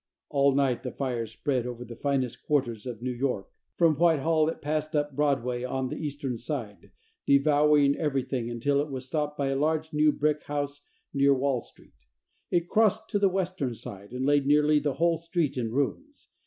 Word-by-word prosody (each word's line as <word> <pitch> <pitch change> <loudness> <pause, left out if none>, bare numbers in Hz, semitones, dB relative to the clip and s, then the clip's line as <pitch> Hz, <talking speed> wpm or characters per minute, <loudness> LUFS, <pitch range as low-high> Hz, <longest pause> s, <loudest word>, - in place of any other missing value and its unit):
All 140 -1 +3
night 135 -3 +1
the 130 - -4
fire 125 -4 -3
spread 125 +2 -2
over 125 0 -6
the 120 0 -9
finest 130 -2 -1
quarter 140 -5 +1 0.2
of 120 -1 -8
New 130 - -1
York. 125 -5 -2 0.3
From 165 -2 +5
Whitehall 160 0 +3
it - - -5
passed 155 +1 -2
up 145 -2 0
Broadway 130 -4 0
on 130 0 -2
the - - -5
eastern 140 -5 -4
side, 115 - -6 0.4
devouring 145 0 +4
everything, 135 -5 -1
until 140 +4 +1
it 150 - -4
was 130 -2 -5
stopped 150 +2 -2
by 140 -1 0
a 135 - 0
large 155 +2 0
new 150 0 +4
brick 150 0 0
house 145 0 -3 0.3
near 140 0 +4
Wall 135 -2 0
Street. 60 - -22 0.4
It 175 0 +1
crossed 220 +1 +2
to 205 - +1
the 200 -1 +4
western 180 -9 -2
side, 100 -1 -9
and 125 +1 -3
laid 145 -1 +3
nearly 150 +1 +4
the 145 -1 -1
whole 165 +1 +2
street 165 -4 -1
in 115 -3 -2
ruins. 270 - -3
140 Hz, 185 wpm, -27 LUFS, 125-150 Hz, 0.4 s, From